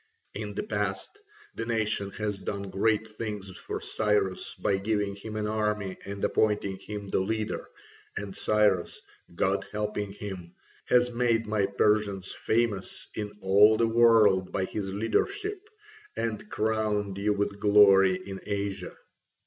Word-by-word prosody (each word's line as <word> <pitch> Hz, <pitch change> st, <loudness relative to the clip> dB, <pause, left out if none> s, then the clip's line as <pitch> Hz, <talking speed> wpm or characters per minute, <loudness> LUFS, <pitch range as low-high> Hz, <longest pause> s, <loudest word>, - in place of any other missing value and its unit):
In 105 Hz, -1 st, -5 dB
the -, -, -2 dB
past 105 Hz, -, -3 dB, 0.3 s
the -, -, -4 dB
nation 110 Hz, -3 st, 0 dB
has 105 Hz, -2 st, -3 dB
done 100 Hz, 0 st, -4 dB
great 110 Hz, +2 st, +1 dB
things 105 Hz, -3 st, -6 dB
for -, -, -5 dB
Cyrus 105 Hz, -3 st, 0 dB
by 100 Hz, -, 0 dB
giving 100 Hz, 0 st, -1 dB
him 105 Hz, +2 st, -8 dB
an 105 Hz, -1 st, -1 dB
army 105 Hz, -2 st, -1 dB
and 100 Hz, 0 st, -3 dB
appointing 105 Hz, -3 st, +1 dB
him 105 Hz, -1 st, -7 dB
the -, -, +1 dB
leader, 110 Hz, +3 st, -2 dB, 0.5 s
and 100 Hz, -2 st, -5 dB
Cyrus, 105 Hz, -5 st, +2 dB, 0.4 s
God 95 Hz, +2 st, +1 dB
helping 105 Hz, -1 st, -2 dB
him, 95 Hz, -4 st, -8 dB, 0.3 s
has 125 Hz, 0 st, +3 dB
made 115 Hz, -1 st, +1 dB
my 105 Hz, -2 st, +1 dB
Persians 100 Hz, -1 st, +1 dB
famous 110 Hz, -4 st, -1 dB
in 105 Hz, -1 st, -4 dB
all 105 Hz, +3 st, +6 dB
the 115 Hz, -, +3 dB
world 110 Hz, -5 st, +5 dB
by 95 Hz, -, 0 dB
his 95 Hz, 0 st, -4 dB
leadership, 395 Hz, -, -1 dB, 0.5 s
and 110 Hz, -2 st, -3 dB
crowned 105 Hz, -2 st, -1 dB
you 105 Hz, +1 st, +2 dB
with 100 Hz, 0 st, -2 dB
glory 100 Hz, -2 st, +6 dB
in 95 Hz, -1 st, -7 dB
Asia. 100 Hz, -1 st, -3 dB
105 Hz, 140 wpm, -28 LUFS, 100-110 Hz, 0.5 s, all